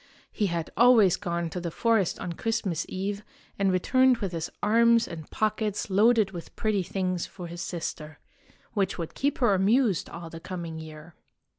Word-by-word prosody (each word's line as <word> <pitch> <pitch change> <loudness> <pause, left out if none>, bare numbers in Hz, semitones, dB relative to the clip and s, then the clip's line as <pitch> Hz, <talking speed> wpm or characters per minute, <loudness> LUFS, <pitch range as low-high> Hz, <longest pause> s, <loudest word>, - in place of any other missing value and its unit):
He 210 - 0
had 170 -2 -3
always 230 -6 +6
gone 170 -1 -3
to 180 - -4
the 175 -1 -3
forest 220 +1 +1
on 175 - -4
Christmas 215 -4 -2
Eve 200 +2 -3 0.4
and 195 -1 +3
returned 255 +7 +3
with 195 -5 -3
his 165 -2 -4
arms 230 +2 +4
and 160 -3 -8
pockets 215 -1 -1
loaded 215 +1 +4
with 175 -3 -9
pretty 215 -3 0
things 185 -1 -2
for 180 - -9
his 170 +1 -7
sister, 155 -3 -5 0.6
which 195 -4 0
would 165 -2 -5
keep 285 +1 -1
her 240 -6 +3
amused 200 +1 +2
all 170 -1 -8
the 165 - -8
coming 170 -2 -6
year. 155 +1 -11
190 Hz, 170 wpm, -27 LUFS, 170-220 Hz, 0.6 s, always